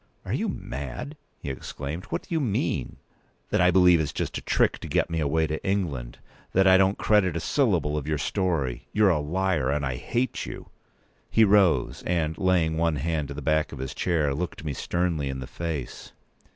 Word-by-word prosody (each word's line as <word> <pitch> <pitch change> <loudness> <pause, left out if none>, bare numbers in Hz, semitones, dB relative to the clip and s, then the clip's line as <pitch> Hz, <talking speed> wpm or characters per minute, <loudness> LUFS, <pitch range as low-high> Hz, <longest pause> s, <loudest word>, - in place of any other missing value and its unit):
"Are - - -3
you - - 0
mad?" 70 - -6 0.2
he 70 - -5
exclaimed. 70 +5 -6
"What - - -4
do - - -7
you 165 - +2
mean?" 120 -9 -1 0.6
"That - - +2
I 90 - +6
believe 90 -2 +6
it's 75 -3 -1
just - - -3
a - - -12
trick - - +1
to - - -7
get - - 0
me 85 - -1
p. - - +1
203away 80 +2 +1
to 80 - -3
England—that 90 0 -2
I 95 -1 +7
don't 95 +1 +4
credit 100 -6 +2
a - - -1
syllable 90 - +1
of 75 -1 -3
your 75 -1 0
story. 75 -4 -1
You're 105 -2 +5
a 80 - +1
liar, 85 -2 0
and 70 0 0
I 65 -2 -2
hate 120 - -2
you!" - - -8 0.6
He 110 - +4
rose, 100 -5 +3
and, 80 -3 0
laying 85 -4 +2
one 85 -1 +1
hand 75 0 -2
on 70 - -6
the 75 - -6
back 75 +1 +1
of 75 - -7
his 65 0 -5
chair, 80 -6 0
looked 85 +2 -4
me 75 - -2
sternly 85 -2 -1
in 65 - -3
the 65 - -5
face. 80 -3 -5
80 Hz, 205 wpm, -26 LUFS, 70-95 Hz, 0.6 s, I